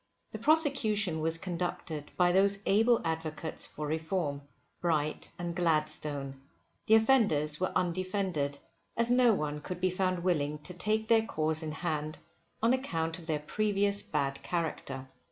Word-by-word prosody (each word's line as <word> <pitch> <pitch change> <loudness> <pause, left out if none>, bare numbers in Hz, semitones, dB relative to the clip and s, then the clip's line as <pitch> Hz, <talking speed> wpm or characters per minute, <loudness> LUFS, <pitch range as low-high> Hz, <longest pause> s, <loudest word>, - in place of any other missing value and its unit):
The 220 - -6
prosecution 225 - +3
was 165 +1 0
conducted 170 -3 -4
by 180 -1 +4
those 195 +2 +4
able 225 +4 +4
Advocates 160 -1 -3
for 150 - -6
Reform, 160 -1 -2 0.4
Bright 155 -3 -1
and 175 -1 -4
Gladstone. 155 -5 -1 0.5
The 220 - +7
offenders 210 - +3
were 185 - 0
undefended, 185 -5 -1 0.4
as 235 +1 +3
no 245 -1 +5
one 150 -6 -2
could 180 +3 -6
be 185 0 +1
found 185 -1 -1
willing 150 -5 0
to 180 - -7
take 215 +4 0
their 225 -1 +5
cause 160 -6 +2
in 155 -1 -4
hand 155 -1 -3 0.5
on 230 +2 +5
account 165 -11 -2
of 165 - -12
their 155 -2 -1
previous 205 +1 +1
bad 140 -2 -2
character. 145 -6 -3
175 Hz, 145 wpm, -30 LUFS, 155-200 Hz, 0.5 s, The